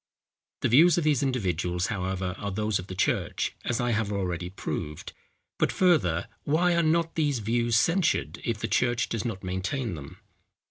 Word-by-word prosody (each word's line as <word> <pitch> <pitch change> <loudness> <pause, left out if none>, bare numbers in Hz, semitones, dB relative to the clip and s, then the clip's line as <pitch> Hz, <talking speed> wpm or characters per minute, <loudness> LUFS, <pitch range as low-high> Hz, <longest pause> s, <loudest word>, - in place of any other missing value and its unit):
The - - +2
views 160 +8 +6
of 170 - +1
these 150 -4 +2
individuals, 90 - 0
however, 95 -1 -2
are 100 - -3
those 105 +1 -1
of 90 - -8
the 95 - -6
church, 95 - 0
as 120 - -1
I 120 0 +1
have 110 -2 0
already 90 -3 -2
proved. 75 -5 -5 0.5
But - - +2
further, 105 - +2 0.2
why 170 +4 +2
are 170 - +3
not 165 +1 +1
these 145 -4 +1
views 115 +2 0
censured 165 +9 +1
if 115 -2 -1
the 110 - -3
church 120 +3 +1
does 115 +1 -2
not 105 -5 -4
maintain 95 +6 -2
them? 70 -4 -9
110 Hz, 175 wpm, -27 LUFS, 95-140 Hz, 0.5 s, views